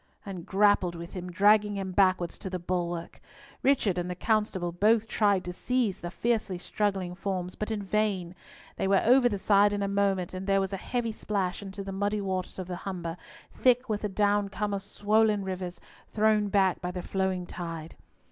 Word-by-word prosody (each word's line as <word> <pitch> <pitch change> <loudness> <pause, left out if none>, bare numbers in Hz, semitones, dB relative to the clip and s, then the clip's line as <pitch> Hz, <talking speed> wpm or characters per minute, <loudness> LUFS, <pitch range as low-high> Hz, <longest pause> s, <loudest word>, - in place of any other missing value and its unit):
and 185 -4 -7
grappled 195 -3 +3
with 170 +1 -8
him, 180 -2 -6
dragging 205 +2 +4
him 190 -1 -3
backwards 185 -2 +2
to 190 - -5
the 185 - -3
bulwark. 175 -1 -3 0.4
Richard 220 -10 +2
and 175 0 -3
the 180 - -3
constable 210 -4 0
both 215 +5 +3
tried 205 -4 +2
to 180 -1 -5
seize 240 0 0
the 175 - -5
fiercely 215 0 -1
struggling 190 -1 -2
forms, 185 -1 -3
but 210 - -4
in 215 -2 -2
vain. 195 -3 0 0.4
They - - 0
were 195 0 +3
over 245 +1 +6
the 205 - -2
side 205 +1 +4
in 205 0 -1
a - - 0
moment, 195 -3 0
and 185 +1 -5
there 195 0 +3
was 195 0 -2
a - - -1
heavy 235 +3 -2
splash 200 -4 -2
into 195 0 -7
the 195 - -6
muddy 205 +2 -1
waters 190 -2 -3
of 185 - -4
the 180 0 -5
Humber, 175 -3 -5 0.4
thick 250 0 +3
with 210 -1 -1
the 210 - -2
downcome 205 0 0
of 200 - -2
swollen 210 +1 +2
rivers, 185 -2 -5 0.3
thrown 215 -1 +3
back 195 -2 +2
by 180 - -3
the 180 0 -5
flowing 190 -2 -1
tide. 165 -2 -7
195 Hz, 195 wpm, -28 LUFS, 180-210 Hz, 0.4 s, over